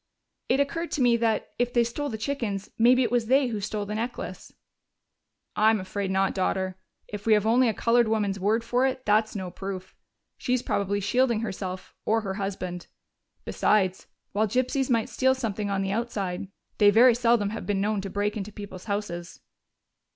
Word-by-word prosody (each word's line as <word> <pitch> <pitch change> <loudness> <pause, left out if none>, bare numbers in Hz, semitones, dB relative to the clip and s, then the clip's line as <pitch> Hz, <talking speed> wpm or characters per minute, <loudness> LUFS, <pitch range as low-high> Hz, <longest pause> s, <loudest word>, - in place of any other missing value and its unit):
"It 265 - +3
occurred 330 +4 -1
to 285 - 0
me 240 -1 +5
that, 225 -2 0
if 245 0 +1
they 240 - +4
stole 285 +5 -3
the 220 - -4
chickens, 215 -5 -3
maybe 250 +3 +5
it 235 - -1
was 240 -2 +1
they 265 +1 +3
who 215 -3 -3
stole 210 +1 -3
the 210 - -5
necklace." 235 +3 -5 1.0
"I'm 220 0 +4
afraid 195 +1 -3
not, 190 0 +1
daughter. 190 0 -1 0.3
If 205 +1 -7
we 220 - +6
have 210 -1 +3
only 240 +2 +4
a - - 0
colored 235 0 +3
woman's 205 -3 0
word 215 +4 +1
for 245 +3 +2
it, 260 0 -4
that's 215 +1 +2
no 185 -3 -4
proof. 190 0 -7 0.4
She's 250 -1 0
probably 200 0 -1
shielding 235 +2 +2
herself 185 -4 -5
or 225 +1 +2
her 195 -3 -3
husband.... 185 -3 -4 0.6
Besides, 190 -3 +1 0.2
while 215 +2 +1
gypsies 255 +4 0
might 230 -3 +2
steal 260 0 +2
something 215 -5 -3
on 195 -1 0
the 195 - -2
outside, 200 -5 -2 0.3
they 205 - +7
very 235 +4 +7
seldom 230 -3 +2
have 225 - -6
been 205 -2 0
known 205 0 0
to 195 - -5
break 205 +2 -1
into 210 0 -5
people's 200 -3 -9
houses." 200 -5 -4
215 Hz, 185 wpm, -26 LUFS, 195-240 Hz, 1.0 s, they